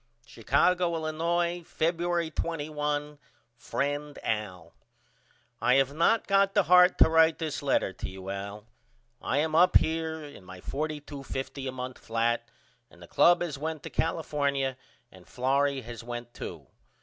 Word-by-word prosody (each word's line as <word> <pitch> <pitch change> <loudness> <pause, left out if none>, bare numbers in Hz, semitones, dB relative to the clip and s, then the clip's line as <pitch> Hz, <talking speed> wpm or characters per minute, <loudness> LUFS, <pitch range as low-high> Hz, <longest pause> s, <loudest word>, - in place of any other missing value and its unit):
Chicago, 170 +10 +1
Illinois, 170 +2 -1
Febuery 170 0 -1
21. 150 -2 -3 0.4
FRIEND 145 +5 -3
AL: 95 -6 -3 0.9
I 125 - +4
have 135 0 +2
not 170 +9 +2
got 195 0 +3
the 205 - +5
heart 180 +1 +6
to - - +7
write 160 0 +4
this 155 -3 -3
letter 135 -8 +1
to - - -6
you 95 0 -7
Al. 100 +2 -6 0.6
I 140 - -1
am 155 +2 +1
up 175 +3 +6
here 160 -1 -2
in 145 -9 -11
my 90 0 -11
$42.50 140 0 -5
a - - -4
month 130 0 -6
flat 115 +1 -1 0.4
and 85 - -19
the 85 - -12
club 175 - +4
has 150 -5 -5
went 155 0 -4
to - - -7
California 140 -5 -1 0.4
and 90 -1 -17
Florrie 135 +2 +1
has 120 -1 -9
went 120 0 -7
too. 80 -5 -8
145 Hz, 145 wpm, -28 LUFS, 120-160 Hz, 0.9 s, to